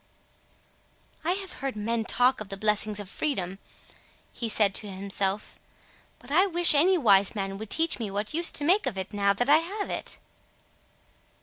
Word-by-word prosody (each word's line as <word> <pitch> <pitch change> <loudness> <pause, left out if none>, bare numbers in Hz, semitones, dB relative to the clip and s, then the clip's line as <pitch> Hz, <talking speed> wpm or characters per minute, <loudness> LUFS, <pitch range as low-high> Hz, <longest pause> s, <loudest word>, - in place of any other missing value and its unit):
"I 345 +3 +1
have 385 -1 -5
heard 270 -3 -3
men 225 +2 -2
talk 250 0 +2
of 210 - -7
the 195 - -6
blessings 210 0 +1
of 205 - -7
freedom," 195 - -3 0.7
he 230 - -4
said 210 -2 +3
to 210 - -1
himself, 195 +1 -3 0.6
"but 245 - -15
I 365 +6 +4
wish 350 -2 +5
any 355 +6 +4
wise 200 - +4
man 195 -1 -4
would 220 -1 -8
teach 325 +3 -1
me 220 -3 -3
what 205 +5 -4
use 335 +2 +3
to 290 - -1
make 360 +1 +2
of 225 -7 -3
it 190 +2 -6
now 200 -1 +2
that 245 +5 -2
I 295 +2 +6
have 395 +5 -5
it." - - -4
220 Hz, 180 wpm, -26 LUFS, 200-310 Hz, 0.7 s, I